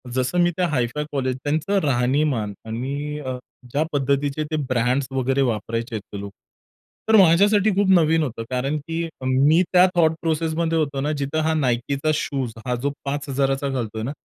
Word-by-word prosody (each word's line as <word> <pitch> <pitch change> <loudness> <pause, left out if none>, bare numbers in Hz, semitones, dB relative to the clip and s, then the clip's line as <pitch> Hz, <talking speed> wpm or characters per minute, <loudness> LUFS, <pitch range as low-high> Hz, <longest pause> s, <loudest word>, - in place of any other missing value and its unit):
जसं 130 +7 0
मी 175 - +4
त्या 180 - +2
हाय 130 -7 +1
five 150 - -1
college 130 -2 -1
त्यांचं 155 +7 0
राहणीमान 130 -4 +1
आणि 140 +6 -4
अ, 130 -3 -4 0.3
ज्या 145 +4 +1
पद्धतीचे 140 +1 0
ते - - 0
ब्रँड्स 125 +2 +1
वगैरे 135 +1 0
वापरायचे 115 -1 -2
ते 100 0 -9
लोक, 100 0 -7 0.8
तर 220 - +6
माझ्यासाठी 200 +3 +5
खूप 200 0 +2
नवीन 165 -3 +4
होतं 120 -5 -4
कारण 135 +4 -1
की 165 +3 -4 0.2
मी 140 +6 +4
त्या 180 0 +7
थॉट 160 -2 +4
प्रोसेसमध्ये 165 0 0
होतो 140 -3 -1
ना 150 +2 0
जिथं 140 +3 -1
हा 160 0 +1
Nikeचा 135 +4 0
शूज 135 -6 -2
हा 125 -1 0
जो 140 - +1
5,000चा 140 -1 -1 0.2
घालतोय 115 -5 -3
ना 125 - -3
140 Hz, 170 wpm, -22 LUFS, 130-155 Hz, 0.8 s, त्या